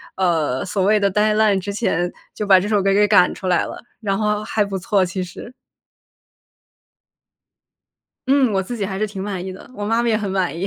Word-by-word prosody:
呃， 160 -8 0
所 190 0 -1
谓 215 +2 +4
的 200 -1 +1
deadline 210 0 +3
之 200 +2 -5
前， 175 -5 0 0.2
就 210 - -4
把 190 -2 +6
这 205 - -3
首 210 -2 +2
歌 195 0 +2
给 210 +1 +4
赶 190 -4 +4
出 190 - -6
来 180 -1 +2
了， - - -9 0.2
然 195 -3 -1
后 210 0 0
还 215 -1 0
不 200 -1 -4
错， 190 +1 +1
其 185 +1 -3
实。 180 +7 -10 2.7
嗯， 265 -4 +3
我 195 - +1
自 240 +6 -6
己 205 - -2
还 190 0 -4
是 215 - 0
挺 195 -2 -7
满 190 -3 -4
意 190 - -5
的， 190 - -13
我 205 - -5
妈 225 +2 +1
妈 240 - 0
也 220 - +2
很 205 -2 -3
满 185 -5 -1
意。 190 - -2
200 Hz, 270 characters per minute, -20 LUFS, 185-210 Hz, 2.7 s, 把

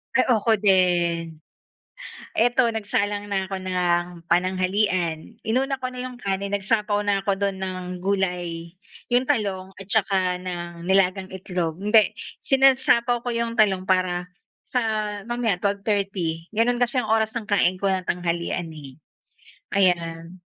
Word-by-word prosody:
Ay, 260 - +4
ako 220 -3 +3
din. 175 -5 +2 1.0
Eto, 240 +1 +3
nagsalang 205 -2 -2
na 190 -1 0
ako 195 - -4
ng 175 -2 -1
pananghalian. 185 -2 0
Inuna 265 +3 0
ko 255 - -2
na 250 0 -6
'yong 250 -1 -7
kanin, 195 -1 -2
nagsapaw 205 +1 +1
na 195 -1 +1
ako 195 -1 0
do'n 200 -1 0
ng 185 -1 -4 0.2
gulay. 180 -3 -2 0.3
'Yong 245 0 +3
talong 200 -8 -1
at 195 - -10
tsaka 190 -3 +1
ng 175 -1 -6
nilagang 190 +1 +2
itlog. 180 -3 -3
Hindi, 210 +2 +4 0.3
sinasapaw 260 -3 +3
ko 245 - -2
'yong 230 0 -2
talong 195 -4 +2
para 180 -1 +1 0.4
sa 250 - 0 0.4
mamaya, 240 -4 0
12:30. 195 -4 -2
Gano'n 240 +3 +2
kasi 245 +2 0
ang 230 - -3
oras 220 0 +1
ng 215 - -12
kain 185 -2 +2
ko 200 - 0
ng 190 -1 0
tanghalian, 175 0 -2
eh, 140 -2 -11 0.7
ayan. 170 -2 0
195 Hz, 135 wpm, -24 LUFS, 180-220 Hz, 1.0 s, Ay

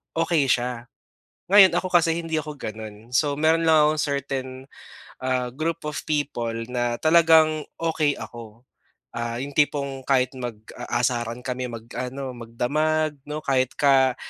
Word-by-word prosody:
okey 165 -3 +2
siya. 120 -1 -1 0.6
Ngayon, 190 -3 +8
ako 185 - -1
kasi 165 -1 +4
hindi 165 -2 -2
ako 150 -1 -7
ganun. 110 +1 -8
So 145 +2 +2
meron 160 +2 +3
lang 155 -2 +6
ako - - +3
certain, 135 -2 -3 0.6
ah, 130 -1 0
group 160 +5 -3
of 150 - -3
people 140 -7 -1 0.2
na 120 -1 -1
talagang 160 -1 +5
okey 160 -3 0
ako. 115 0 -10 0.5
Ah, 115 0 -3
'yung 145 - -6
tipong 140 -2 0
kahit 130 -2 +2
mag-aasaran 120 0 -3
kami, 125 -1 -3
mag-ano 125 +3 -6
magdamag 150 +7 -1
‘no, 150 +1 -4
kahit 130 -2 0
ka 135 -3 +4
135 Hz, 135 wpm, -24 LUFS, 120-155 Hz, 0.6 s, Ngayon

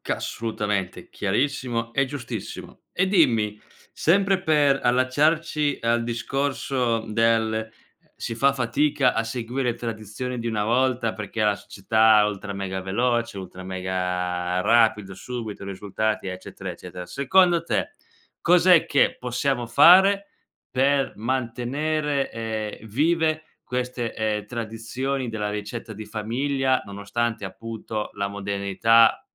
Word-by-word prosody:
Assolutamente 105 -4 -3
chiarissimo 115 +1 -1
e 140 +2 +2
giustissimo, 125 -6 -7
e 185 - +1
dimmi, 115 - +3 0.3
sempre 195 +2 +2
per 145 -4 +3
allacciarci 145 +4 +2
al 115 0 +1
discorso, 125 -1 -1
mhmm, 110 - -7
del, 115 0 +2
ehm, 110 0 -3 0.5
si 115 - -4
fa 135 +4 +3
fatica 135 +1 +1
a 115 - 0
seguire 120 +1 -2
tradizioni 115 +2 -5
di 115 - -4
una 110 -3 0
volta 120 0 +1
perché 110 +1 -4
la 105 -1 +3
società 110 +2 +3
ultra 100 -1 -4
mega 95 -1 -4
veloce, 115 +2 0
ultra 95 -1 -9
mega 90 -1 -2
rapido, 110 -2 +3
subito, 110 0 -6
risultati, 100 +2 -2
eccetera, 95 +1 -7
eccetera, 90 +1 -8
secondo 170 - +3
te, - - -1 0.5
cos'è 180 0 +5
che 140 - +2
possiamo 125 0 -1
fare 190 - +6 0.4
per 135 +1 +1
mantenere, 135 +5 -1
ehm, 110 -1 -5
vive 155 +5 +1 0.2
queste, 125 -1 -3
ehm, 105 -1 -1
tradizioni 120 +4 -3
della 105 -2 -2
ricetta 105 +2 -5
di 110 +2 -7
famiglia, 130 +5 0
nonostante 105 +2 -3
appunto, 110 +1 -6
la 100 0 -2
modernità 100 +3 +3
115 Hz, 115 wpm, -24 LUFS, 105-135 Hz, 0.5 s, fare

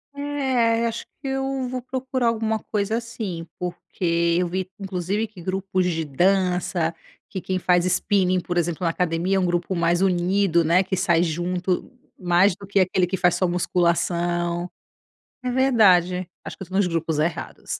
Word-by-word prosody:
É, 260 -5 +1
acho 230 - -4 0.2
que 280 - -5
eu 270 -1 -2
vou 255 0 -4
procurar 260 0 -2
alguma 220 -1 0
coisa 210 +1 -1
assim, 220 -8 -5
porque 170 -1 -1
eu 180 - +1
vi, 185 +1 -3
inclusive, 195 +2 -2
que 205 -4 -13
grupos 185 +1 -1
de 165 -2 -1
dança, 180 +1 +1 0.4
que 190 - -4
quem 185 0 -2
faz 180 -1 +2
Spinning, 185 0 +2
por 175 0 -4
exemplo, 170 0 -1
na 170 - +2
academia, 175 +3 0
é - - +3
um 185 - +1
grupo 175 +1 -1
mais 170 +1 +1
unido, 180 -1 +2
né, 170 +3 +4
que 190 0 -2
sai 170 -2 +3
junto, 175 +2 -1 0.3
mais 180 +1 +3
do 200 +1 -11
que 200 0 +1
aquele 185 0 +2
que 185 +2 -3
faz 180 -1 +3
só 185 - +1
musculação. 175 0 0 0.7
É 250 - -2
verdade, 190 -9 +3 0.2
acho - - -7
que 190 - -6
tô 185 - -12
nos 200 -1 +3
grupos 165 -2 -1
errados. 160 +2 -3
185 Hz, 170 wpm, -23 LUFS, 175-205 Hz, 0.7 s, né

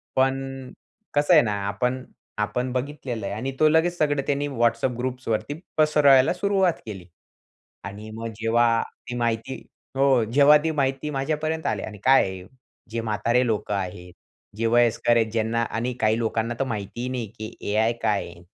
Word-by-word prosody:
पण 135 0 -1 0.4
कसं 145 +4 +3
आहे 155 - +8
ना 105 - -1
आपण 125 +6 -1 0.4
आपण 125 +4 -1
बघितलेलं 130 -4 -4
आहे 100 - -3
आणि 130 +5 -3
तो 155 - +6
लगेच 165 +3 +2
सगळं 145 -3 +1
त्यांनी 145 0 0
WhatsApp 120 -1 0
ग्रुप्सवरती 125 0 -2 0.2
पसरवायला 150 -3 +5
सुरुवात 190 -1 +2
केली 95 -5 -8 0.8
आणि 105 +2 -8
मग 115 +1 -5
जेव्हा 115 0 +3 0.3
ती 120 - -4
माहिती 115 +1 -1 0.4
हो, 135 -3 +4
जेव्हा 140 +6 +6
ती 160 - 0
माहिती 135 -1 -1
माझ्यापर्यंत 155 +3 -2
आली - - -1
आणि 105 - -7
काय 135 +1 +6
आहे 95 -1 -5 0.5
जे 115 0 -2
म्हातारे 115 +3 +1
लोकं 105 -2 -1
आहेत, 90 -2 -5 0.4
जे 115 - -1
वयस्कर 120 0 +3
आहेत, 110 -1 +1
ज्यांना 115 +1 0
आणि 120 +2 -3
काही 110 0 +3
लोकांना 115 0 -1
तर - - +2
माहिती 105 -2 -5
ही 125 - -3
नाही 125 -3 -3
की 110 0 -7 0.2
AI 110 +2 +2
काय 105 -3 +1
आहे? 85 0 -13
120 Hz, 165 wpm, -24 LUFS, 110-135 Hz, 0.8 s, आहे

